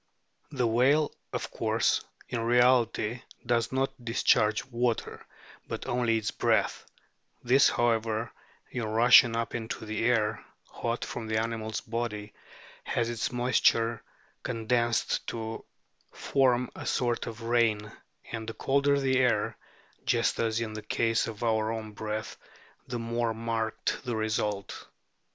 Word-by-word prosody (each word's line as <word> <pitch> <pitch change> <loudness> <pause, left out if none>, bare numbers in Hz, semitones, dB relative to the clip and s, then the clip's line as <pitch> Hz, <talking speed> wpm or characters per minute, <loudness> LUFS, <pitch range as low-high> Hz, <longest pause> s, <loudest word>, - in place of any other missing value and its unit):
The 130 -5 -1
whale, 135 +6 +3 0.2
of - - -4
course, - - +1 0.3
in 120 - -3
reality 120 -1 +3 0.2
does 115 -1 +1
not 135 +1 0
discharge 110 -2 +2
water, 120 -2 -2 0.4
but - - -5
only 120 -2 +1
its 110 -2 -2
breath; - - 0 0.6
this, 130 +3 +5
however, 115 -1 0 0.4
in 120 - -3
rushing 115 +2 +6
up 115 0 -2
into 115 -1 -4
the 110 +1 -3
air 110 -3 +1 0.2
hot 115 0 -3
from 115 -2 -6
the 110 0 0
animal's 110 -1 -3
body, 110 -2 -4 0.5
has 120 0 -1
its 115 -1 -2
moisture 120 -2 +2 0.4
con 115 -3 -5
densed 120 -1 +1
to 115 -1 -5 0.5
form 125 -2 +1
a - - -7
sort 120 -2 0
of 115 0 -7
rain, 115 -3 +1 0.4
and 115 -1 -4
the 115 - -7
colder 140 +3 +2
the 130 -1 +2
air, 125 -2 +2 0.5
just - - +1
as 110 -1 +1
in 110 -2 -3
the 110 - -5
case 115 +1 +1
of 110 0 -6
our 110 -1 +1
own 110 -1 -5
breath, 110 +1 -5 0.5
the 125 - -3
more 115 0 -1
marked 115 -1 -2
the 120 -3 -2
result. 105 -2 -2
115 Hz, 135 wpm, -29 LUFS, 110-120 Hz, 0.6 s, rushing